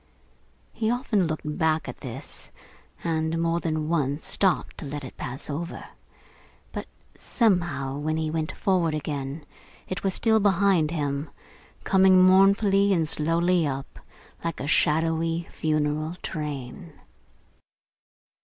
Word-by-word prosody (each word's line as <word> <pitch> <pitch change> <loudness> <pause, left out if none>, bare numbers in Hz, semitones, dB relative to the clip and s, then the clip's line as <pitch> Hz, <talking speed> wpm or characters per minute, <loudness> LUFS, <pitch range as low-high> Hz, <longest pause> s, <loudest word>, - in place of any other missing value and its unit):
He 220 -1 -1
often 235 -7 +1
looked 155 -1 -4
back 160 -1 +1
at - - -7
this, - - -9 0.5
and, 160 0 0
more 165 0 +1
than 155 -2 -2
once, 150 -3 0
stopped 190 -3 0
to - - -7
let 145 +1 -5
it 130 - -9
pass 135 0 -5
over; 165 +4 -5 0.9
but, - - -5 0.3
somehow, 170 - 0
when 155 +2 -1
he 160 -1 -1
went 160 -1 -2
forward 180 -6 +1
again, 145 0 -4 0.4
it 185 - -4
was 195 -1 0
still 220 -1 +3
behind 195 -5 +3
him, 145 -2 -2 0.5
coming 190 -1 +5
mournfully 195 +1 +5
and 165 -4 +1
slowly 165 +2 +2
up, 135 -1 -5 0.4
like 165 -2 -3
a 135 - -3
shadowy 165 +2 +1
funeral 155 +1 -1
train. 150 +2 -5
160 Hz, 125 wpm, -26 LUFS, 150-185 Hz, 0.9 s, coming